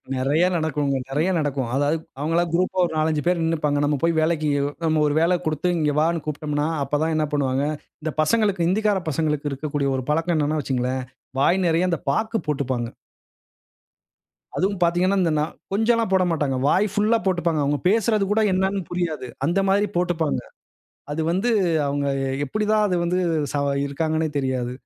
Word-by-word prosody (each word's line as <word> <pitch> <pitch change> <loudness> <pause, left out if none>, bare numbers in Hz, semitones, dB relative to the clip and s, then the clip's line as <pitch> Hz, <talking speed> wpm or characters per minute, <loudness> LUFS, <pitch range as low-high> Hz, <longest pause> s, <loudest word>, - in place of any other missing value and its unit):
நெறைய 140 +6 +1
நடக்குங்க. 150 -4 0
நெறைய 150 +7 0
நடக்கும். 140 -5 -2
அதாவது 145 +3 +1 0.2
அவங்க 155 +3 -1
எல்லாம் 170 -1 +1
குரூப்பா 185 +2 0
ஒரு - - -4
நாலஞ்ச 155 0 +1
பேரு 175 -1 +2
நின்னுப்பாங்க. 150 -3 0
நம்ம 145 0 +1
போயி 165 0 +3
வேலைக்கு 155 -1 +1 0.4
நம்ம 155 -1 +2
ஒரு 145 - 0
வேல 175 +2 +3
குடுத்து 155 +3 0
இங்க 150 -2 +1
வான்னு 165 0 0
கூப்ட்டோம்ன்னா, 150 0 -2 0.2
அப்ப 145 +2 -1
தான் 160 0 0
என்ன 155 -1 +1
பண்ணுவாங்க. 135 -1 +1 0.4
இந்த 155 -1 -2
பசங்களுக்கு 200 0 +2
ஹிந்தி 200 +5 +1
கார 200 -2 +2
பசங்களுக்கு 150 -1 -1
இருக்கக்கூடிய 140 0 -2
ஒரு 130 - -4
பழக்கம் 165 +3 +1
என்னன்னா 150 +1 0
வச்சுக்கங்களேன், 130 -1 -1 0.4
வாய் 180 +7 +3
நெறைய 170 +2 +2
அந்த 170 -4 -1
பாக்கு 220 +9 0
போட்டுப்பாங்க. 130 -5 -1 1.7
அதுவும் 195 +1 0
பாத்தீங்கன்னா, 180 +3 +2
இந்த 170 -3 +2
நா - - +2 0.3
கொஞ்சல்லாம் 225 0 +2
போடமாட்டாங்க. 165 -8 +1
வாய் 195 +7 +3
புல்லா 215 +3 +3
போட்டுப்பாங்க. 175 -4 +1
அவங்க 145 +1 0
பேசுறது 215 0 +2
கூட 220 +1 +3
என்னன்னு 190 +1 0
புரியாது. 160 -7 -2 0.2
அந்த 175 +6 +1
மாதிரி 205 +2 +3
போட்டுப்பாங்க. 170 -3 0 0.7
அது 160 - -2
வந்து 195 +7 +1 0.4
அவங்க 140 0 -1 0.4
எப்டி 210 +10 -2
தான் 215 -1 +3
அது 185 - 0
ஸ - - 0
வந்து 175 +1 0 0.7
இருக்காங்கன்னே 160 +3 -1
தெரியாது. 130 -2 -1
160 Hz, 165 wpm, -23 LUFS, 145-180 Hz, 1.7 s, போயி